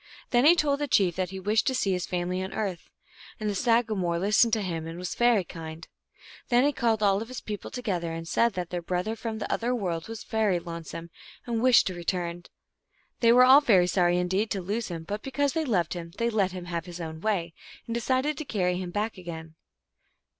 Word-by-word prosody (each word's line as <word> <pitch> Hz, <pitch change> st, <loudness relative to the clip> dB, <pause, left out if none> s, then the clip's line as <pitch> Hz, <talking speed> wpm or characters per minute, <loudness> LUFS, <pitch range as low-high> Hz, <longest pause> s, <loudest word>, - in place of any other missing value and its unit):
Then 245 Hz, +1 st, +4 dB
he 340 Hz, -, +8 dB
told 285 Hz, -4 st, +1 dB
the 290 Hz, -, -1 dB
chief 190 Hz, -9 st, +3 dB
that 185 Hz, -1 st, -1 dB
he 190 Hz, 0 st, -6 dB
wished 210 Hz, +6 st, +1 dB
to 260 Hz, -, +2 dB
see 200 Hz, -6 st, +1 dB
his 180 Hz, -1 st, -1 dB
family 180 Hz, +1 st, -2 dB
on 190 Hz, 0 st, -5 dB
earth, 195 Hz, -6 st, -3 dB, 0.5 s
and 215 Hz, -, -3 dB
the 205 Hz, -, 0 dB
sagamore 215 Hz, -6 st, +1 dB
listened 210 Hz, +5 st, +3 dB
to 220 Hz, -2 st, +2 dB
him 165 Hz, -3 st, -3 dB
and 165 Hz, +1 st, -7 dB
was 180 Hz, 0 st, -4 dB
very 240 Hz, -5 st, +3 dB
kind. 165 Hz, -1 st, -9 dB, 0.6 s
Then 245 Hz, +1 st, +4 dB
he 290 Hz, -, +3 dB
called 225 Hz, -4 st, +1 dB
all 195 Hz, -1 st, +4 dB
his 230 Hz, +3 st, -6 dB
people 210 Hz, -2 st, -6 dB
together, 185 Hz, -9 st, -3 dB
and 165 Hz, 0 st, -6 dB
said 235 Hz, +6 st, +2 dB
that 180 Hz, -2 st, -4 dB
their 175 Hz, -1 st, -2 dB
brother 180 Hz, +6 st, -2 dB
from 225 Hz, -1 st, -5 dB
the 215 Hz, -, -3 dB
other 245 Hz, +2 st, 0 dB
world 175 Hz, -7 st, -3 dB
was 225 Hz, -1 st, -7 dB
very 220 Hz, -5 st, +1 dB
lonesome, 170 Hz, 0 st, -7 dB, 0.3 s
and 230 Hz, -2 st, -1 dB
wished 255 Hz, -1 st, +6 dB
to 185 Hz, -, -2 dB
return. 175 Hz, 0 st, -3 dB, 0.7 s
They 230 Hz, -1 st, +5 dB
were 250 Hz, +1 st, +7 dB
all 270 Hz, +3 st, +8 dB
very 195 Hz, -10 st, +5 dB
sorry 175 Hz, -1 st, +2 dB
indeed 190 Hz, +5 st, 0 dB
to 195 Hz, -, -2 dB
lose 215 Hz, +5 st, -2 dB
him, 165 Hz, -3 st, -6 dB
but 205 Hz, +5 st, -4 dB
because 275 Hz, +1 st, -1 dB
they 320 Hz, -1 st, 0 dB
loved 185 Hz, -, 0 dB
him 170 Hz, -1 st, -7 dB
they 235 Hz, 0 st, 0 dB
let 200 Hz, -4 st, +1 dB
him 180 Hz, -1 st, -7 dB
have 170 Hz, -1 st, -4 dB
his 175 Hz, 0 st, -8 dB
own 160 Hz, -1 st, -6 dB
way, 175 Hz, -6 st, -1 dB, 0.3 s
and 230 Hz, -, -4 dB
decided 260 Hz, +5 st, 0 dB
to -, -, -3 dB
carry 180 Hz, -9 st, 0 dB
him 180 Hz, -1 st, -4 dB
back 210 Hz, +2 st, -3 dB
again. 165 Hz, -2 st, -8 dB
195 Hz, 220 wpm, -27 LUFS, 175-230 Hz, 0.7 s, he